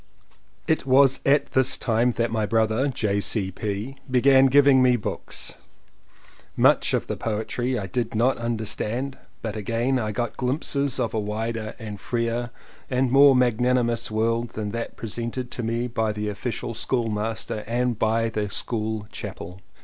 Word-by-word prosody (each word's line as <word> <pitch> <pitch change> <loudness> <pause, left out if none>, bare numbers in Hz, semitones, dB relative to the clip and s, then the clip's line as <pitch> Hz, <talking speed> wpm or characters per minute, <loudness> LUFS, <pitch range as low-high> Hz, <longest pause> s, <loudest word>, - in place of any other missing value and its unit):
It 160 -4 +1
was 135 0 +5
at 140 +1 +3
this 130 0 +3
time 115 +1 +1
that 115 0 -1
my 110 -2 0
brother, 110 +4 +2
J. 105 -6 0
C. 100 -3 0
P., 105 +7 -4
began 130 +1 +5
giving 140 0 +6
me 125 -1 +5
books. 115 - -4 1.0
Much - - +4
of - - -1
the - - -3
poetry 120 +3 -2
I 100 - -3
did 115 +4 -3
not 120 +4 +2
understand 115 +3 -2 0.2
but 110 -2 -3
again 115 +5 0
I 110 -2 -2
got 120 +1 -3
glimpses 140 +1 0
of 115 - -1
a 110 - 0
wider 110 +1 -3
and 105 -3 -7
freer 120 0 -1 0.4
and 125 -1 +1
more 140 0 +7
magnanimous 120 -1 +2
world 115 +2 0
than 105 -1 -3
that 115 +1 -5
presented 120 +3 -4
to - - -4
me 115 +1 -1
by 110 -3 -1
the 105 0 -3
official 115 +3 -4
schoolmaster 110 -2 -2
and 120 -1 0
by 115 +1 +1
the 105 -2 -2
school 110 0 -2
chapel. 90 +1 -8
115 Hz, 155 wpm, -24 LUFS, 110-125 Hz, 1.0 s, more